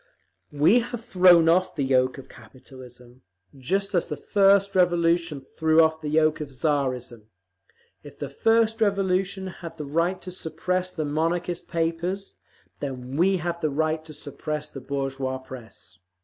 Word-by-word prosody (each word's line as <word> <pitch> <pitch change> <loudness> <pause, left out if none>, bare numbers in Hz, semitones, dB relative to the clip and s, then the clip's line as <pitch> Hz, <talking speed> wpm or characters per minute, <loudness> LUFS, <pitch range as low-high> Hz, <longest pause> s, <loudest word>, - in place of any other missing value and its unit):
"We 155 +11 +4
have 240 -1 -6
thrown 180 -7 +6
off 185 +2 +2
the 145 - -1
yoke 130 -1 +2
of 135 - -10
capitalism, 125 0 -15 0.3
just 195 +11 -2
as 175 - +1
the 150 - -5
first 200 +3 +3
revolution 170 -3 +2
threw 160 +4 +1
off 160 0 +3
the 150 - -4
yoke 155 0 +2
of 150 - -5
Tsarism. 130 -5 -2 0.7
If - - -13
the - - -4
first 225 0 +1
revolution 195 -1 0 0.2
had 165 -1 -8
the 150 - -5
right 170 +6 0
to 185 - -7
suppress 180 +2 -3
the 155 -4 -3
Monarchist 165 +4 -2
papers, 170 +4 -2 0.4
then 130 -2 -6
we 185 +5 +3
have 170 0 -4
the 155 - +1
right 155 +2 -1
to 155 - -11
suppress 150 +1 -5
the 135 - -8
bourgeois 135 0 -3
press. 115 -9 -11
160 Hz, 150 wpm, -25 LUFS, 135-180 Hz, 0.7 s, thrown